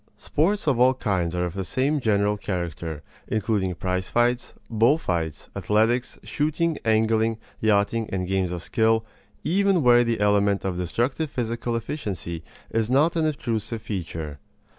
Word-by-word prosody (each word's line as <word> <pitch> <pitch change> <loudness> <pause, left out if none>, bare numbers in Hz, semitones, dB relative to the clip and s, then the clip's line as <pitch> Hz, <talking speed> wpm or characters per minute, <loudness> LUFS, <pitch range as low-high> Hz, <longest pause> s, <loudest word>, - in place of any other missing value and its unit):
Sports 200 +8 0
of 130 -5 +2
all 130 +1 +5
kinds 95 -8 -1
are 90 0 0
of 85 - -4
the 95 0 -3
same 135 +9 0
general 105 -3 +2
character, 85 -6 -4 0.2
including 105 -4 0
prize 90 0 -2
fights, 120 +1 +1
bull 115 +6 +3
fights, 85 - -3
athletics, 115 +4 +1
shooting, 155 +2 0
angling, 110 0 +2 0.2
yachting, 110 +1 +2
and 90 -1 -2
games 95 -2 0
of 90 -1 -4
skill, 110 -1 +2 0.4
even 190 +1 +2
where 120 -1 +6
the 115 -2 -1
element 100 -1 +2
of 95 -2 -1
destructive 120 - -1
physical 120 -1 -2
efficiency 100 - -4 0.3
is 115 0 0
not 145 +7 +3
an 160 -1 +2
obtrusive 115 -6 -3
feature. 80 -8 -5
110 Hz, 145 wpm, -25 LUFS, 95-125 Hz, 0.4 s, where